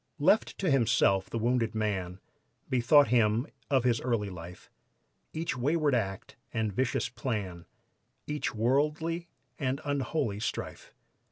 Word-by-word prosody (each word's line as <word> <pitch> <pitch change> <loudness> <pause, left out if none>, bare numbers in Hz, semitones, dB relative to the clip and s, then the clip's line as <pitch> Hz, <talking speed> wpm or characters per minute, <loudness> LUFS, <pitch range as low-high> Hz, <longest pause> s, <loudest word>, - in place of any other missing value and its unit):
Left 160 +8 +3
to 185 -5 0
himself 115 -7 +3
the - - -3
wounded 115 -1 0
man 95 -4 -2 0.5
Bethought 130 +2 +5
him 115 0 +3 0.2
of 135 -3 +3
his 120 -2 +2
early 115 -5 -1
life, 90 0 -10 0.6
Each 165 -2 -2
wayward 145 +3 +1
act 95 -6 -2
and 110 -2 -1
vicious 130 +4 0
plan, 100 -8 -4 0.6
Each 150 0 -2
worldly 150 +8 0 0.3
and 130 +1 -1
unholy 135 -6 -1
strife. 110 - -5
120 Hz, 120 wpm, -29 LUFS, 105-145 Hz, 0.6 s, Bethought